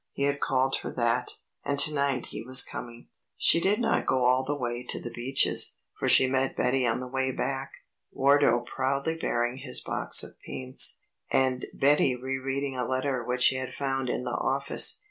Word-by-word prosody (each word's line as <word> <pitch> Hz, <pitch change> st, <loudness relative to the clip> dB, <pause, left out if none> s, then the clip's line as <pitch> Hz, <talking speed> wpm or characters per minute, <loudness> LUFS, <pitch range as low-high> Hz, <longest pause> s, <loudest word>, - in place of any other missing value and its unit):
He 140 Hz, -, -2 dB
had 140 Hz, 0 st, 0 dB
called 135 Hz, 0 st, +1 dB
her -, -, -6 dB
that, 120 Hz, -2 st, 0 dB, 0.3 s
and 140 Hz, -, -2 dB
to 155 Hz, +2 st, +3 dB
night 140 Hz, -3 st, -1 dB
he -, -, -6 dB
was 130 Hz, +3 st, +4 dB
coming. 120 Hz, 0 st, -9 dB, 0.3 s
She -, -, +4 dB
did 200 Hz, +5 st, +1 dB
not 230 Hz, -1 st, 0 dB
go 130 Hz, -1 st, +1 dB
all 130 Hz, +1 st, +3 dB
the 145 Hz, +2 st, -3 dB
way 120 Hz, -2 st, -4 dB
to -, -, +2 dB
The 120 Hz, -, -7 dB
Beeches, 125 Hz, +3 st, +2 dB, 0.2 s
for -, -, 0 dB
she -, -, +7 dB
met 130 Hz, 0 st, -1 dB
Betty 125 Hz, 0 st, +1 dB
on 115 Hz, +1 st, 0 dB
the 130 Hz, -, -6 dB
way 130 Hz, +1 st, -1 dB
back, 135 Hz, +1 st, -3 dB, 0.4 s
Wardo 140 Hz, -3 st, +3 dB
proudly 140 Hz, +5 st, -2 dB
bearing 120 Hz, -5 st, -2 dB
his 135 Hz, -, 0 dB
box -, -, +3 dB
of -, -, -10 dB
paints, 130 Hz, 0 st, -1 dB, 0.3 s
and 130 Hz, -1 st, 0 dB
Betty 140 Hz, -2 st, +2 dB
re 130 Hz, +2 st, -4 dB
reading 135 Hz, +1 st, -3 dB
a 125 Hz, -, -2 dB
letter 130 Hz, -1 st, -2 dB
which 125 Hz, +1 st, -1 dB
she 130 Hz, -, +4 dB
had 130 Hz, 0 st, -6 dB
found 135 Hz, -2 st, -2 dB
in 125 Hz, -, -2 dB
the 125 Hz, -, -4 dB
office. 135 Hz, +3 st, +1 dB
130 Hz, 195 wpm, -27 LUFS, 125-140 Hz, 0.4 s, she